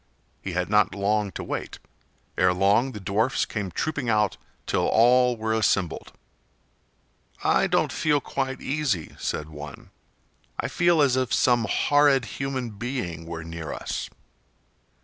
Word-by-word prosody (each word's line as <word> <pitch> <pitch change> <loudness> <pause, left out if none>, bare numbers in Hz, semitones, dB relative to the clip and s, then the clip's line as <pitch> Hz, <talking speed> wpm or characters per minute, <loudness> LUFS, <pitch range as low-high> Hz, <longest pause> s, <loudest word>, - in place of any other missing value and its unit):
He 95 - -5
had 90 0 -1
not 105 -2 +3
long 100 0 0
to - - -5
wait. - - -5 0.6
Ere 90 0 +3
long 105 +8 +3
the 105 - -6
dwarfs 110 +7 0
came 105 -4 -4
trooping 145 - -2
out 105 -3 +2 0.3
till - - +1
all 125 +1 +4
were 110 0 -1
assembled. 100 -5 0 1.3
"I - - +3
don't - - +1
feel 150 -2 +2
quite 135 -1 -3
easy," 135 - -2
said 75 0 -3
one. 75 -2 -10 0.7
"I - - -1
feel 175 -3 +3
as 130 -3 +3
if 130 -2 0
some 120 -3 +3
horrid 145 -3 +3
human 130 -2 -4
being 100 - -5
were 85 -1 -6
near 80 -2 -6
us." - - -4
110 Hz, 140 wpm, -25 LUFS, 95-130 Hz, 1.3 s, all